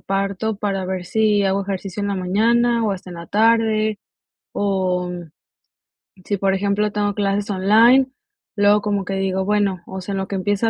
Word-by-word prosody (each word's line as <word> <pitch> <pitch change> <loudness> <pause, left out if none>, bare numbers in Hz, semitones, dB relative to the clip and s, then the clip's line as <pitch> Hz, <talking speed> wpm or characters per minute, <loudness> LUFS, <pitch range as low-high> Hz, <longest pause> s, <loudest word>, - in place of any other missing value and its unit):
parto 195 +2 -2
para 195 -2 -2
ver 185 -1 -3
si 210 +1 +2
hago 195 0 +1
ejercicio 195 0 -5
en 200 - -1
la 200 - -1
mañana 230 +6 +2
o 210 - +1
hasta 185 -1 -8
en 175 - -8
la 170 0 -9
tarde, 220 0 +2 0.6
o 185 -3 -1 1.1
si, 205 - -1
por 195 0 +1
ejemplo, 200 +2 0
tengo 205 -1 -1
clases 200 0 -1
online, 225 +7 +5 0.5
luego 205 0 +4
como 205 -1 -1
que 195 - -3
digo: 190 0 -1
"Bueno, 200 -3 0
o 190 - -6
sea, 195 +2 -5
en 195 - -2
lo 190 - -3
que 200 - -3
empieza 205 +4 0
200 Hz, 180 wpm, -20 LUFS, 190-210 Hz, 1.1 s, online